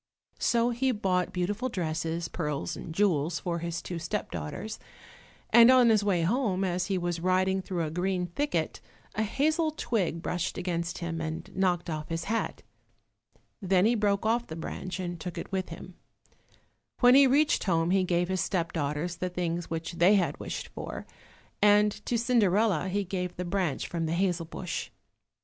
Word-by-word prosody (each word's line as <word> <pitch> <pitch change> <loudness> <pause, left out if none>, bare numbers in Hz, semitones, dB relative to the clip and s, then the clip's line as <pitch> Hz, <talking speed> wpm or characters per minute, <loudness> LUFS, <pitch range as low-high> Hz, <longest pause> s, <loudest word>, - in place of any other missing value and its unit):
So 235 0 +2
he 260 +2 +1
bought 185 -5 0
beautiful 205 +8 -1
dresses, 165 -2 -2
pearls 150 -5 -3
and 165 - -7
jewels 170 -3 +1
for 170 -2 -2
his 170 0 -4
two 175 -2 -4
step 165 - -3
daughters, 85 - -5 0.7
and 235 0 +8
on 255 -2 +7
his 215 -2 +4
way 185 -5 +2
home, 195 -1 +1
as 180 -1 -1
he 195 -2 0
was 175 -1 -2
riding 185 +2 +2
through 180 -2 -2
a 155 - -3
green 180 +1 -1
thicket, 285 - -2 0.3
a - - -1
hazel 310 +9 +1
twig 195 - -2
brushed 175 0 -2
against 170 -1 -2
him 165 -1 -4
and 160 0 -5
knocked 180 -2 +1
off 155 -2 -4
his 165 0 -2
hat. 225 +4 -2 1.0
Then 190 0 +3
he 230 - +4
broke 205 -2 +1
off 235 +2 +1
the 160 - -6
branch 175 +2 -5
and 175 -2 -4
took 180 +2 -6
it - - -6
with 190 -1 -2
him. 175 +2 -9 1.1
When 245 0 +8
he 275 0 +8
reached 290 +4 +3
home 165 -2 +2
he 190 0 +3
gave 175 -1 +1
his 185 0 0
step 170 -3 -1
daughters 155 +3 -2
the 180 +1 -2
things 175 -1 -3
which 165 +1 -4
they 185 +5 +6
had 190 -3 0
wished - - -5
for, - - -7 0.6
and 210 0 +5 0.2
to 240 - +1
Cinderella 215 -6 +2
he 200 +2 0
gave 180 -1 -3
the 180 - -4
branch 175 -6 -1
from 165 -2 -2
the 160 - -1
hazel 175 -2 0
bush. 175 +1 -5
180 Hz, 175 wpm, -28 LUFS, 170-205 Hz, 1.1 s, and